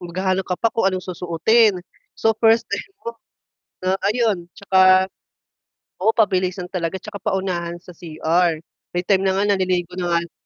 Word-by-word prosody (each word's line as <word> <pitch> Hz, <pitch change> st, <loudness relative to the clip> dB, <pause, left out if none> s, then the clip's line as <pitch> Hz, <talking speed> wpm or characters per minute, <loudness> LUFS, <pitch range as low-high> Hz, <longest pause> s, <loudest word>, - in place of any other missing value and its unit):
maghahanap 185 Hz, +2 st, -2 dB
ka 180 Hz, -, -1 dB
pa 230 Hz, -, 0 dB
kung 210 Hz, -4 st, +2 dB
anong 185 Hz, -2 st, -3 dB
susuotin. 185 Hz, +5 st, +2 dB, 0.4 s
So 225 Hz, -, +2 dB
first 225 Hz, 0 st, +4 dB
time -, -, -4 dB
mo 235 Hz, -, -5 dB, 0.7 s
na 185 Hz, -, +2 dB, 0.2 s
ayun 215 Hz, -7 st, -1 dB
'tsaka 185 Hz, -1 st, +4 dB, 1.0 s
oo, 215 Hz, -, +4 dB
pabilisan 185 Hz, -3 st, +1 dB
talaga 175 Hz, +1 st, -2 dB
'tsaka 200 Hz, -1 st, -9 dB
paunahan 185 Hz, -4 st, -2 dB
sa 180 Hz, -, -12 dB
CR. 165 Hz, +1 st, 0 dB, 0.4 s
May 175 Hz, +1 st, -1 dB
time 195 Hz, -2 st, +3 dB
na 190 Hz, -, +2 dB
nga 205 Hz, 0 st, +2 dB
naliligo 180 Hz, -2 st, -1 dB
na 175 Hz, -1 st, -2 dB
nga -, -, +4 dB
lang 170 Hz, -, -26 dB
185 Hz, 160 wpm, -21 LUFS, 175-200 Hz, 1.0 s, first